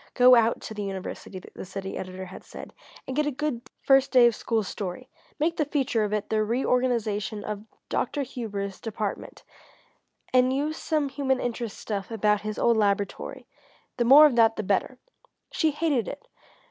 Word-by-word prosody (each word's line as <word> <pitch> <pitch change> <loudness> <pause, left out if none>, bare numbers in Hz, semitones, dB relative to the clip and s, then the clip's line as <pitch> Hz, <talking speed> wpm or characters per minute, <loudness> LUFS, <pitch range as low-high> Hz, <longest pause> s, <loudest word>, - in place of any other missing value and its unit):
"Go 250 0 +7
out 235 -1 +4
to - - -7
the 210 - -5
university," 195 -1 -6 0.2
the - - -8
city 195 +1 -6
editor 185 0 -6
had 185 - -11
said, - - -10 0.3
"and 260 - -5
get 300 0 +1
a - - 0
good 270 -3 -4
first 270 0 +4
day 250 -2 +7
of 235 -2 +4
school 225 -1 -1
story. 200 +6 -6 0.3
Make 330 +3 0
the 305 - +1
feature 265 -6 0
of 210 - -2
it 210 0 -2
the 215 0 +2
reorganisation 230 -3 0
of 210 0 -5 0.2
Dr. 290 - -1
Hubers' 205 -6 -5
department, 215 -2 -5 0.9
and 255 0 +4
use 295 +4 -1
some 305 -3 -1
human 265 -1 0
interest 235 -2 -4
stuff 200 -3 -4
about 210 -2 +1
his 215 0 -5
old 235 -1 +3
laboratory 200 -1 -1 0.5
the 240 - +2
more 275 +6 +9
of 290 -5 +3
that 225 -1 +5
the - - -3
better." 205 +6 0 0.5
She 320 - +2
hated 295 - 0
it! 285 - -8
230 Hz, 175 wpm, -26 LUFS, 205-265 Hz, 0.9 s, more